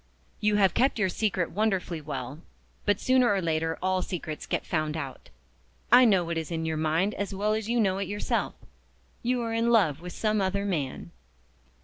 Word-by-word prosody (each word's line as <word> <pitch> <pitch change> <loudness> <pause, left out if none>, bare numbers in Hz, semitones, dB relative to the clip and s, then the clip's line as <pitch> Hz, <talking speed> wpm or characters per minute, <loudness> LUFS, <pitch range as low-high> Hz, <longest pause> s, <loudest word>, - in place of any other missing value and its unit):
"You 210 0 +2
have 195 -4 +4
kept 265 +1 +2
your 200 -4 +1
secret 185 -3 -1
wonderfully 190 -5 -1
well 145 -1 -6 0.5
but 205 -1 +3
sooner 255 -3 +3
or 200 - +2
later 160 -1 -1
all 185 0 +1
secrets 160 -5 -5
get - - -2
found 155 -1 -1
out. 140 -4 -7 0.6
I 250 +1 +8
know 195 -6 +4
what 170 -1 -2
is 160 - -6
in 165 -1 -3
your 160 0 -1
mind 160 +6 +1
as 200 -1 -4
well 210 +2 +1
as 220 0 -2
you 240 0 +2
know 195 -3 +2
it 200 - -2
yourself. 205 +2 -2 0.7
You 245 0 0
are 230 -1 -3
in 230 +1 +1
love 180 -11 +3
with 180 0 -7
some 215 -1 0
other 195 +1 0
man." 140 - -3
190 Hz, 195 wpm, -27 LUFS, 160-215 Hz, 0.7 s, I